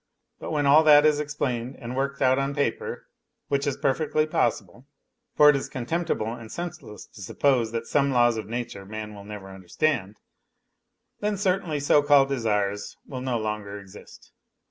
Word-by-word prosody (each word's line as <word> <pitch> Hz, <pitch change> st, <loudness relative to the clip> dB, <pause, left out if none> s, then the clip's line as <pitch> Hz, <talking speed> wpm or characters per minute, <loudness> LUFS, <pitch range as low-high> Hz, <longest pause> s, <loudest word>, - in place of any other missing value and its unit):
But -, -, -6 dB
when 150 Hz, -2 st, 0 dB
all 145 Hz, +3 st, +6 dB
that 150 Hz, -1 st, +7 dB
is 150 Hz, -1 st, +3 dB
explained 135 Hz, -4 st, -3 dB
and 120 Hz, -1 st, -7 dB
worked 140 Hz, +1 st, -1 dB
out 130 Hz, +1 st, +4 dB
011 135 Hz, +1 st, -2 dB
paper 140 Hz, -6 st, -2 dB, 0.4 s
(which 140 Hz, +1 st, 0 dB
is 140 Hz, -, -1 dB
perfectly 155 Hz, +2 st, +1 dB
possible, 120 Hz, -, -2 dB, 0.5 s
for 150 Hz, 0 st, +8 dB
it -, -, -1 dB
is 135 Hz, -, -3 dB
contemptible 130 Hz, -4 st, -2 dB
and 115 Hz, -2 st, -10 dB
senseless 160 Hz, -11 st, -7 dB
to 105 Hz, -, -15 dB
suppose 120 Hz, +2 st, +1 dB
that 115 Hz, 0 st, -3 dB
some 140 Hz, +3 st, +1 dB
laws 120 Hz, -2 st, +3 dB
of 110 Hz, -3 st, -5 dB
nature 115 Hz, -4 st, -5 dB
man 105 Hz, +1 st, -7 dB
will 100 Hz, -1 st, -11 dB
never 100 Hz, -2 st, -9 dB
understand), 95 Hz, -, -2 dB, 1.0 s
then 210 Hz, 0 st, -1 dB
certainly 185 Hz, -6 st, 0 dB
so 145 Hz, +1 st, +4 dB
called 145 Hz, -2 st, +4 dB
desires 105 Hz, -6 st, -1 dB
will 130 Hz, -3 st, -7 dB
no 125 Hz, -2 st, -1 dB
longer 105 Hz, -2 st, -4 dB
exist. 95 Hz, -2 st, -15 dB
130 Hz, 165 wpm, -25 LUFS, 110-145 Hz, 1.0 s, for